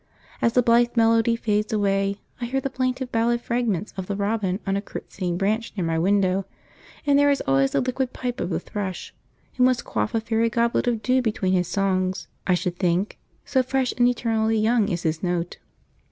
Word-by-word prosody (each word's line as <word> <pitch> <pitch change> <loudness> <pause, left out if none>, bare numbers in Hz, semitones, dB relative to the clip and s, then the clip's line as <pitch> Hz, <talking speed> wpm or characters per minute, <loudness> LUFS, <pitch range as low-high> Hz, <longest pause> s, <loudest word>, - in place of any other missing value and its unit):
As 230 - +2
the 250 - +4
blithe 240 +1 +3
melody 230 0 +4
fades 210 -2 -1
away, 200 -1 +1 0.2
I - - -1
hear 265 +3 -1
the 270 0 -4
plaintive 255 0 -2
ballad 235 +1 +1
fragments 235 -6 -1
of 190 -1 -5
the 200 - -2
robin 200 -2 -1
on 195 -1 0
a 200 - 0
curtsying 180 -3 -5
branch 215 +4 -1
near 180 - 0
my 165 0 0
window; 190 +1 +2 0.6
and 285 -1 +4
there 285 0 +5
is 280 - +2
always 135 0 +2
the - - +2
liquid 255 0 -1
pipe 245 -1 -4
of - - -2
the 170 - -1
thrush, 195 -3 -5 0.4
who 250 - +3
must 255 -1 +2
quaff 105 - -2
a - - +3
fairy 225 +1 0
goblet 235 +2 +1
of 230 -2 0
dew 255 0 +3
between 210 -5 0
his 180 -2 +1
songs, 185 -1 0 0.2
I 180 - +4
should 175 0 -3
think, 180 +2 0 0.3
so 265 -2 +2
fresh 260 0 0
and 245 -1 +4
eternally 225 -2 +1
young 220 -1 +2
is 175 -3 -2
his 160 -1 -1
note. 175 -1 -2
220 Hz, 200 wpm, -24 LUFS, 185-240 Hz, 0.6 s, there